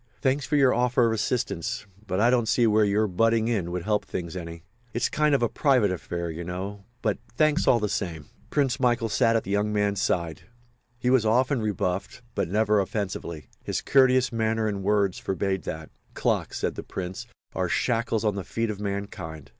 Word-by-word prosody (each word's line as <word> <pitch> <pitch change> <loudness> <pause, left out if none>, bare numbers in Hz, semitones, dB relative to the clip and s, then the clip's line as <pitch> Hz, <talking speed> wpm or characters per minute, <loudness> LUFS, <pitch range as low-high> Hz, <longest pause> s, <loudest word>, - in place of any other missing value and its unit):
Thanks 135 +1 +1
for 150 - 0
your 135 -3 +5
offer 125 +1 +3
of 115 - +2
assistance—but 105 -3 -3
I 120 +3 +4
don't 120 -3 +2
see 120 +1 +3
where 110 -1 +4
your 105 +1 +2
butting 115 +4 +2
in 100 -8 0
would 90 0 -3
help 105 +1 +1
things 85 -1 -5
any. 85 -2 -7 0.3
It's 120 - +1
a - - -28
kind 150 -1 +3
of 120 -4 0
private 130 -9 +3
affair, 85 -1 -4
you 80 +2 -6
know—but 100 +5 -4 0.2
thanks 155 +2 +2
all 120 - +5
the 105 - 0
same." 85 -7 -3 0.2
Prince 140 -2 +1
Michael 120 -3 +2
sat 115 0 +3
at 115 - +1
the 100 - -6
young 105 +1 +1
man's 100 -2 +1
side. 85 -4 -1 0.6
He 125 +1 0
was 130 -3 +4
often 125 +3 +2
rebuffed 100 +1 -2
but 85 - -1
never 105 +1 +3
offensively. 95 -6 -3 0.2
His - - -2
courteous 130 -2 +4
manner 110 -1 0
and 100 -2 -2
words 100 -1 +1
forbade 95 -2 -2
that. 80 0 -6 0.2
"Clocks," - - 0
said - - -1
the - - -6
Prince, 90 0 -6 0.3
"are - - -1
shackles 115 -2 0
on 105 - +2
the 100 -1 -4
feet 115 +5 -2
of 100 - -7
mankind. 100 -7 -5
105 Hz, 190 wpm, -26 LUFS, 95-120 Hz, 0.6 s, your